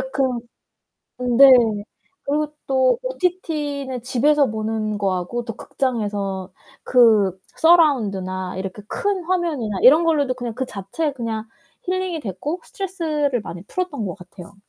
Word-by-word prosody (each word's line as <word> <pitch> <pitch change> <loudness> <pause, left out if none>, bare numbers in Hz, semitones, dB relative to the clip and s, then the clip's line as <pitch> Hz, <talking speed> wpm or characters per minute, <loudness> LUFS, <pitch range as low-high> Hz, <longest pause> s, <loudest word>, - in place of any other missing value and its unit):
근 245 -3 -2 0.8
네. 275 +1 +9 0.7
그리고 300 +1 -1
또 260 - +3
OTT는 300 - -2
집에서 275 +3 +3
보는 215 -1 -2
거하고 195 +4 -2
또 225 -2 -6
극장에서 205 -7 -3 0.3
그 215 -7 +4 0.2
서라운드나 200 - +2
이렇게 190 +2 -5
큰 395 -4 -1
화면이나 315 - -1
이런 305 +7 +7
걸로도 290 -6 +2 0.2
그 260 - -2
자체에 260 - -3
그냥 225 -4 -4 0.4
힐링이 370 -3 -2
됐고 260 - -4
스트레스를 315 - -2
많이 175 -2 -8
풀었던 290 - -3
것 180 - -4
같아요. 180 +1 -13
255 Hz, 275 characters per minute, -21 LUFS, 205-305 Hz, 0.8 s, 네